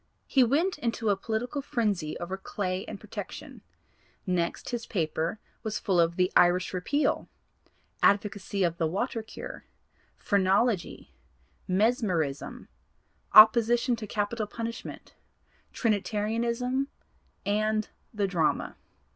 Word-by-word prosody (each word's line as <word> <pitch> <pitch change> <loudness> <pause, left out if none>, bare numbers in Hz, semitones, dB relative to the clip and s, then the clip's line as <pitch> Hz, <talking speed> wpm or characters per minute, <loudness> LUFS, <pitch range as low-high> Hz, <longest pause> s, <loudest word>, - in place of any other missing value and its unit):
He 265 - +4
went 305 +8 +1
into 230 -4 -1
a - - +3
political 225 +7 -3
frenzy 205 - -1
over 175 +2 -4
Clay 190 -1 -3
and - - -7
protection; - - -8 0.6
next 175 -3 -1
his 240 -1 -4
paper 165 +1 -1 0.2
was 220 -1 -3
full 190 -4 +1
of 170 0 +3
the 180 +1 +2
'Irish 180 +1 +4
Repeal,' 285 +12 0 0.7
'Advocacy 200 -1 +2
of 170 -1 0
the 165 - +2
Water 225 +7 -2
Cure,' 220 - -9 0.5
'Phrenology,' 200 0 +1 0.5
'Mesmerism,' 185 - 0 0.7
'Opposition 235 +3 +7
to 215 -2 -6
Capital 210 +1 -2
Punishment,' 230 +2 -7 0.6
'Trinitarianism' 230 +4 0 0.6
and 215 +1 0 0.2
the 210 -3 0
'Drama.' 175 -5 0
210 Hz, 105 wpm, -28 LUFS, 185-235 Hz, 0.7 s, Opposition